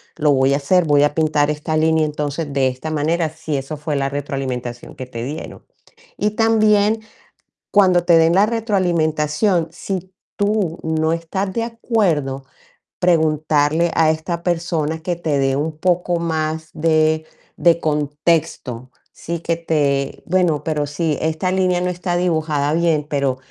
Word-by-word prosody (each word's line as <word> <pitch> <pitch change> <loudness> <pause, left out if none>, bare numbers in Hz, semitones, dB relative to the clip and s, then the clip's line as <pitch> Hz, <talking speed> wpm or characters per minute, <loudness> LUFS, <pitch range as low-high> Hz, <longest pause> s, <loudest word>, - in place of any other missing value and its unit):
lo 150 -2 +2
voy 135 0 +3
a - - +1
hacer. 170 +5 +2
Voy 145 -2 +4
a 145 - +2
pintar 150 -2 +2
esta 150 +1 -2
línea 160 0 +3
entonces, 150 0 -3
de 135 -1 +2
esta 130 +5 -4
manera", 155 +2 0
si 160 -1 -4
eso 135 +3 -5
fue 150 0 -3
la 135 -1 0
retroalimentación 130 -4 -5
que 130 - -6
te 115 -2 -6
dieron. 145 +5 -7 0.6
Y 210 - 0
también, 215 -1 +3 0.7
cuando 185 -4 +4
te 170 -2 +6
den 165 +1 +4
la 195 +2 +5
retroalimentación, 175 -5 +1
si 185 +1 -5 0.2
tú 205 -5 0
no 160 0 0
estás 165 +4 -2
de 230 - -1
acuerdo, 175 - -1 0.5
preguntarle 155 -1 +2
a 160 -1 +4
esta 170 +2 -4
persona, 165 -3 -1
que 175 +2 -2
te 155 -4 -1
dé 135 0 +1
un 150 +2 -2
poco 175 0 +1
más 160 -1 -2
de 155 0 +2 0.3
de 170 -1 +3
contexto. 150 -4 -1 0.2
Sí, 170 +1 -5
que 170 0 0
te: 145 -4 -1
"Bueno, 175 -4 +1
pero 150 -2 -1
si 150 +1 -1
esta 160 +3 -1
línea, 185 -1 +1
no 180 - 0
está 180 0 -2
dibujada 155 -4 0
bien, 165 -3 +1
pero 140 -3 0
160 Hz, 155 wpm, -19 LUFS, 145-175 Hz, 0.7 s, te